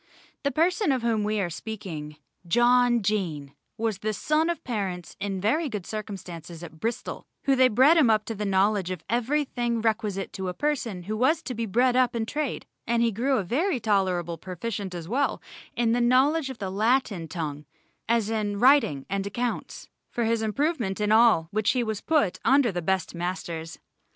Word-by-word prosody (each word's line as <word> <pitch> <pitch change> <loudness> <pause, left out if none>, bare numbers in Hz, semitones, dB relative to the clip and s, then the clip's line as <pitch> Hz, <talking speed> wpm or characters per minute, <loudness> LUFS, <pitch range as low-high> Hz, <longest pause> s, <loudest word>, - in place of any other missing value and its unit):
The 280 - +1
person 350 +4 +2
of 255 -3 0
whom 225 -3 +1
we 210 0 0
are 175 -3 -1
speaking, 160 -7 -7 0.3
John 240 +3 +4
Jaen, 170 -9 -2 0.2
was 220 -3 -1
the 215 +1 -2
son 310 +8 +1
of 340 - -3
parents 190 -8 -4
in 195 -1 -3
very 280 - +1
good 210 -6 -5
circumstances 180 -6 -7
at 160 -2 -10
Bristol, 230 +5 -4 0.2
who 275 - +3
they 260 0 +6
bred 260 +8 +5
him 285 -8 +5
up 215 -1 +3
to 225 - -4
the 210 -1 -4
knowledge 195 -1 +2
of 185 -4 -5
everything 240 -1 0
requisite 210 -3 -1
to 190 -1 -4
a 180 - -5
person 245 -11 -2
who 215 +4 -3
was 265 +8 +2
to 255 - -4
be 230 -1 -3
bred 245 +5 +2
up 250 -2 +3
in 225 -1 -1
trade, 295 +2 -3 0.2
and 235 0 +2
he 230 - +2
grew 255 +6 +1
a 205 - 0
very 275 - 0
tolerable 185 -6 0
proficient 190 +1 -5
as 170 -2 -6
well 270 +8 0 0.4
in 235 -1 +2
the 240 +1 +2
knowledge 270 +5 +3
of 260 - -7
the 195 -3 -4
Latin 215 -4 +1
tongue, 150 -3 -5 0.4
as 230 -2 +2
in 210 -2 -1
writing 235 - +4
and 195 +1 -2
accounts, 240 +4 -4 0.2
for 240 - -2
his 230 0 +1
improvement 220 - -1
in 210 0 +1
all 220 -7 +5
which 215 0 +1
he 250 -2 +1
was 220 -3 -3
put 300 - +1
under 270 -4 +4
the 175 -1 -3
best 190 +2 -1
masters. 170 -2 -4
220 Hz, 190 wpm, -26 LUFS, 190-250 Hz, 0.4 s, they